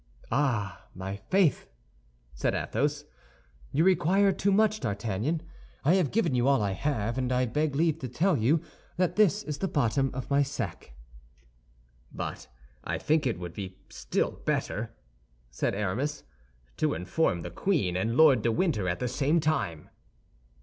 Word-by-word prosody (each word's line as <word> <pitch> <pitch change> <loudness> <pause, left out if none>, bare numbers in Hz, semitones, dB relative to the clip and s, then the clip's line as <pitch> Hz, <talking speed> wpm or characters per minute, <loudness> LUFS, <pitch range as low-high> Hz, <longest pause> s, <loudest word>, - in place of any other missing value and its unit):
"Ah, 120 -8 0
my 95 +2 -5
faith!" 180 - +1 0.7
said - - -1
Athos, - - -1 0.7
"you 155 - +2
require 190 +2 +4
too 200 +1 0
much, 215 +1 +3
D'Artagnan. 110 - -2 0.4
I 155 - +5
have 185 -7 +3
given 225 - +1
you 125 +1 +2
all 140 -1 +4
I 100 -2 0
have, 120 +1 -1
and 130 -1 -1
I 125 0 +2
beg 145 +4 -1
leave 160 +1 +2
to 130 - -4
tell 170 +9 +2
you 140 +6 +2 0.4
that 180 -1 +1
this 210 0 +3
is 150 -2 -5
the 190 - 0
bottom 135 - +1
of 130 - -4
my 140 +1 +4
sack." 125 - -4 1.2
"But - - -6 0.4
I - - -2
think 150 -2 +1
it 115 - -1
would 90 -1 -7
be 95 -1 -7
still - - -1
better," - - -1 0.6
said - - -1
Aramis, 105 +9 -2 0.5
"to - - +1
inform 90 - 0
the 85 - -6
queen 115 - 0
and 110 +6 0
Lord 145 -7 +6
de 115 - +1
Winter 110 - 0
at 90 - -1
the 125 - -2
same 140 +6 +1
time." 150 - -1
135 Hz, 155 wpm, -28 LUFS, 105-160 Hz, 1.2 s, Lord